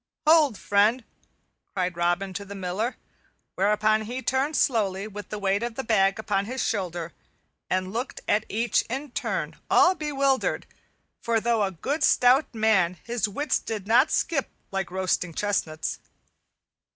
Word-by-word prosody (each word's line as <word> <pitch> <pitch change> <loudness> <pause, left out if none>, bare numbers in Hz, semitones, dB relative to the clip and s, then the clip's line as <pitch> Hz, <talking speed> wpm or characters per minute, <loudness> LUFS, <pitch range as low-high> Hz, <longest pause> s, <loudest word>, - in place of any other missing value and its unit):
"Hold, 305 -7 +5
friend!" 210 +6 +2 0.7
cried 180 -2 -1
Robin 175 +3 0
to 200 - -5
the 200 0 -9
Miller; 195 +6 -3 0.6
whereupon 210 +2 +2
he 250 +4 -5
turned 270 +4 0
slowly, 205 -5 +1
with 205 -2 -9
the 210 - -4
weight 200 0 0
of 235 -1 -3
the 265 - -3
bag 195 -4 +2
upon 205 -2 -1
his 255 +3 -2
shoulder, 175 -5 -3 0.6
and 185 +1 -1
looked 245 +4 -4
at 210 +1 +2
each 230 +1 +1
in 270 +3 -4
turn - - -3
all 370 - +6
bewildered, 275 -5 0 0.6
for 230 -1 +1
though 230 0 +1
a 200 - +2
good 265 - -3
stout 250 +2 +4
man 195 -5 +2
his 235 -3 -1
wits 290 +9 0
did 215 -4 -5
not 240 +7 +4
skip 280 -5 0 0.2
like 195 -1 -2
roasting 180 -2 -1
chestnuts. 165 -6 -2
215 Hz, 150 wpm, -26 LUFS, 195-245 Hz, 0.7 s, all